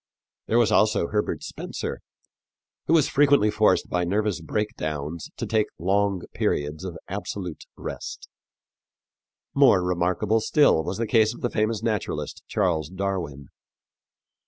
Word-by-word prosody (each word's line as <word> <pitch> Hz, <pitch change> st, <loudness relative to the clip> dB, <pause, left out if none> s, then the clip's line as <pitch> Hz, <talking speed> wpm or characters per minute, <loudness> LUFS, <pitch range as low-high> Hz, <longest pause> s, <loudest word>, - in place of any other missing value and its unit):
There 115 Hz, -, +2 dB
was 120 Hz, -3 st, +4 dB
also 105 Hz, -5 st, +3 dB
Herbert 105 Hz, 0 st, -1 dB
Spencer, -, -, -5 dB, 0.9 s
who 160 Hz, -, +3 dB
was 155 Hz, -4 st, +4 dB
frequently 140 Hz, -7 st, +4 dB
forced -, -, +3 dB
by 90 Hz, 0 st, 0 dB
nervous 100 Hz, 0 st, 0 dB
breakdowns 80 Hz, -4 st, -3 dB
to -, -, -3 dB
take 110 Hz, -1 st, +1 dB
long 95 Hz, +1 st, +1 dB
periods 75 Hz, +4 st, -1 dB
of 90 Hz, -3 st, -5 dB
absolute 95 Hz, -4 st, -5 dB
rest. -, -, -6 dB, 1.3 s
More 130 Hz, -10 st, +5 dB
remarkable 90 Hz, +5 st, +1 dB
still 145 Hz, -, +4 dB
was 95 Hz, -, -3 dB
the 115 Hz, -, -1 dB
case 110 Hz, 0 st, +3 dB
of -, -, -13 dB
the 120 Hz, -, -1 dB
famous 110 Hz, 0 st, 0 dB
naturalist, 110 Hz, -3 st, -2 dB
Charles 85 Hz, -7 st, 0 dB
Darwin. 90 Hz, -7 st, -4 dB
100 Hz, 130 wpm, -25 LUFS, 85-110 Hz, 1.3 s, More